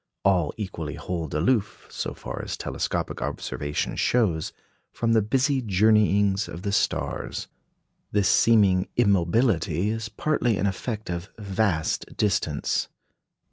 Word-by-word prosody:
All 90 -6 +3
equally 85 -8 -5
hold 85 -4 -4
aloof, 100 +7 0
so - - -4
far - - -6
as - - -4
telescopic - - -3
observation 75 0 -3
shows, 95 -11 +1 0.4
from 115 -1 0
the 110 - +5
busy 130 +5 +1
journeyings 105 -1 +3
of 85 - -8
the 100 - -1
stars. 100 - -1 0.6
This 100 -2 +2
seeming 100 -5 +4
immobility 100 -2 +2
is 115 0 -4
partly 120 -1 0
an - - 0
effect 105 +1 -3
of 85 +2 -4
vast 100 -5 -1
distance. 105 -4 0
100 Hz, 120 wpm, -25 LUFS, 90-110 Hz, 0.6 s, the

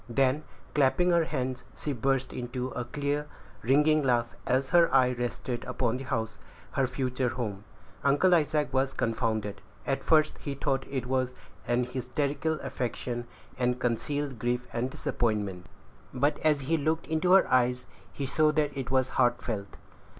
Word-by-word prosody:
Then, 135 +4 +2 0.3
clapping 145 +5 +3
her 170 -1 +4
hands, 130 -3 -3
she 145 - -3
burst 135 +1 0
into 125 +1 -3
a 125 -1 -4
clear, 145 +3 -2 0.3
ringing 150 +5 +4
laugh, 120 -3 +1
as 135 +1 +1
her 170 -1 +5
eye 130 -2 +5
rested 120 0 -3
upon 125 -1 0
the 135 - -7
house 115 -3 -2 0.3
her 135 -2 +1
future 130 0 -1
home. 105 -5 -4 0.4
Uncle 145 +7 +4
Isaac 150 -4 +2
was 135 0 +1
confounded. 110 -3 -1 0.2
At 135 - -1
first 155 -1 +3
he 140 -2 -4
thought 135 -1 -1
it 130 -3 -2
was 130 0 0 0.3
an 120 +1 +2
hysterical 135 +5 -1
affection, 120 -1 -3 0.3
and 125 0 +1
concealed 130 +2 -1
grief 125 +1 -1
and 120 +2 -1
disappointment; 105 -8 -2 0.4
but, 140 +4 +1
as 150 -2 +2
he 160 +5 +1
looked 160 +2 0
into 160 +3 +2
her 195 - +6
eyes, 125 0 +3 0.3
he 135 +8 -4
saw 155 +3 +3
that 150 -2 0
it 130 -2 -4
was 130 -1 +2
heartfelt. 120 -6 0
130 Hz, 155 wpm, -29 LUFS, 120-145 Hz, 0.4 s, her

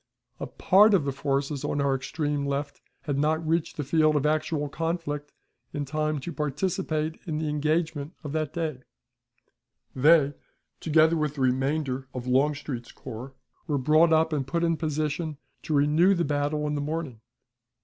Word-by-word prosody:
A - - -4
part 205 +2 +5
of 160 -7 +1
the 140 - 0
forces 140 +1 -2
on 145 - -1
our 140 -1 +2
extreme 145 +2 -2
left 140 0 -3 0.2
had 145 -3 -2
not 155 +2 +1
reached 165 0 0
the 150 - -1
field 155 +2 +3
of 145 0 +1
actual 150 0 0
conflict 150 -2 -3 0.4
in 145 -1 -2
time 155 +2 -1
to 170 - -6
participate 155 +1 -2
in 155 -2 -2
the 155 0 -2
engagement 155 +1 -1
of 145 - -5
that 155 -1 -2
day; 160 -6 -3 1.2
they, 145 +1 +5 0.5
together 160 +1 +4
with 150 -2 -1
the 140 - -4
remainder 135 +1 0
of 125 -1 -4
Longstreet's 135 -1 0
corps, 130 +2 -9 0.3
were 150 -3 0
brought 155 +5 +4
up 160 0 +3
and 135 -3 -1
put 170 +5 -1
in 165 -1 +2
position 155 0 -2 0.2
to 155 - -2
renew 155 +7 +4
the 170 - 0
battle 145 +1 -1
in 150 - -1
the 145 - -1
morning. 145 -6 -4
150 Hz, 165 wpm, -27 LUFS, 140-160 Hz, 1.2 s, part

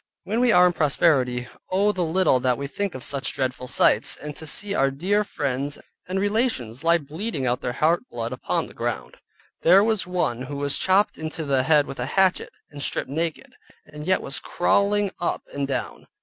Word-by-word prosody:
When 220 +4 -2
we 245 -1 +4
are 180 -3 +6
in 180 - +3
prosperity, 135 -6 +2 0.2
Oh 200 +3 +2
the 185 - -3
little 165 -5 +2
that 125 -1 +1
we 140 - -4
think 195 +6 -3
of 130 - -7
such 140 -1 -1
dreadful 130 -1 -3
sights, - - +3
and 150 0 -8
to 160 - -7
see 200 +5 -1
our 135 -7 +2
dear 190 +10 0
friends, 140 -5 -3 0.3
and 185 +1 -2
relations 205 - -1
lie 170 +1 +4
bleeding 155 - -4
out 125 0 0
their 120 - -3
heart 170 - +1
blood - - -4
upon - - -2
the - - -13
ground. - - -4 0.4
There 185 +4 +6
was 215 -5 +1
one 175 -10 -1
who 130 +2 -6
was 140 0 -2
chopped 190 -1 +2
into 155 0 -4
the 135 -2 +2
head 145 +2 +3
with 135 - -8
a 125 - -2
hatchet, 190 +3 +2 0.2
and 145 -1 -9
stripped 140 - -2
naked, 165 +2 -3 0.3
and 150 +1 -10
yet 185 - +2
was 135 - -1
crawling 200 +2 +1
up 175 - -2
and 140 -1 -2
down. 135 - -4
155 Hz, 200 wpm, -24 LUFS, 135-190 Hz, 0.4 s, are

